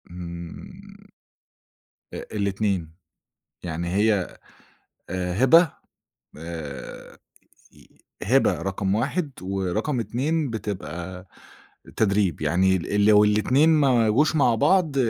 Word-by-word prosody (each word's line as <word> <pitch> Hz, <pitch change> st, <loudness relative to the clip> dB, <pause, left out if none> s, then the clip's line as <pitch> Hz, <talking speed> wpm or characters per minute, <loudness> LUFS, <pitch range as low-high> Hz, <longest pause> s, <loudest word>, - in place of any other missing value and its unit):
امم. 85 Hz, -1 st, -10 dB, 1.0 s
أ -, -, -6 dB
الاتنين. 100 Hz, -4 st, -1 dB, 0.7 s
يعني 85 Hz, 0 st, -4 dB
هي 105 Hz, -3 st, +1 dB, 0.7 s
آآ، 90 Hz, -1 st, -3 dB
هبة 165 Hz, +4 st, +6 dB, 0.7 s
آآ، 80 Hz, -3 st, -8 dB, 1.1 s
هبة -, -, +2 dB
رقم 95 Hz, 0 st, -1 dB
1، 140 Hz, -, -1 dB
ورقم 95 Hz, -, -2 dB
2 140 Hz, +6 st, -1 dB
بتبقى 90 Hz, -4 st, -6 dB, 0.7 s
تدريب. 100 Hz, -5 st, +1 dB
يعني 95 Hz, +5 st, +2 dB
ال 100 Hz, +3 st, 0 dB
لو 105 Hz, -1 st, +6 dB
الاتنين 115 Hz, +9 st, +3 dB
ما 135 Hz, -8 st, +3 dB
جوش 150 Hz, +8 st, +2 dB
مع 125 Hz, -6 st, +3 dB
بعض 165 Hz, +2 st, +2 dB
100 Hz, 90 wpm, -24 LUFS, 90-125 Hz, 1.1 s, هبة